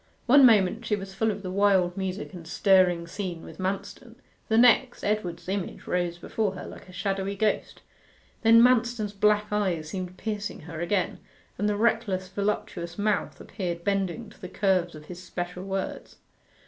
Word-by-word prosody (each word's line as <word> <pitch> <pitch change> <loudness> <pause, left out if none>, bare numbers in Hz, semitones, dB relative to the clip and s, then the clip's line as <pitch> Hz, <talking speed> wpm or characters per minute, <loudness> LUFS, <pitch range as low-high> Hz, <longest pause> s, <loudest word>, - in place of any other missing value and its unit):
One 270 +1 +8
moment 220 0 +3
she 215 -2 0
was 195 -1 -7
full 220 +3 +1
of 205 -1 -4
the 185 - -4
wild 190 -2 +3
music 190 +1 -4
and 170 -3 -9
stirring 180 -2 +3
scene 175 -1 -5
with - - -12
Manston 200 +5 -4 0.3
the 220 - +2
next, 245 +1 +4
Edward's 180 -6 -2
image 195 -1 -4
rose 175 -1 -1
before 200 +2 -2
her - - -7
like - - -11
a - - -11
shadowy 195 +1 -2
ghost. 215 +1 -1 0.6
Then 230 0 +7
Manston's 240 -4 +2
black 210 +1 +2
eyes 185 -7 -1
seemed 185 0 -5
piercing 210 -2 -4
her 165 0 -7
again, 180 +1 0 0.4
and 210 +1 +1
the 205 - 0
reckless 215 -4 +1
voluptuous 190 -3 -3
mouth 210 0 -1
appeared 175 -4 -5
bending 200 +3 -1
to - - -19
the 185 - -7
curves 185 -4 +1
of 150 0 -11
his 180 +2 -9
special 180 0 -5
words. 195 -1 -4
195 Hz, 170 wpm, -27 LUFS, 180-210 Hz, 0.6 s, One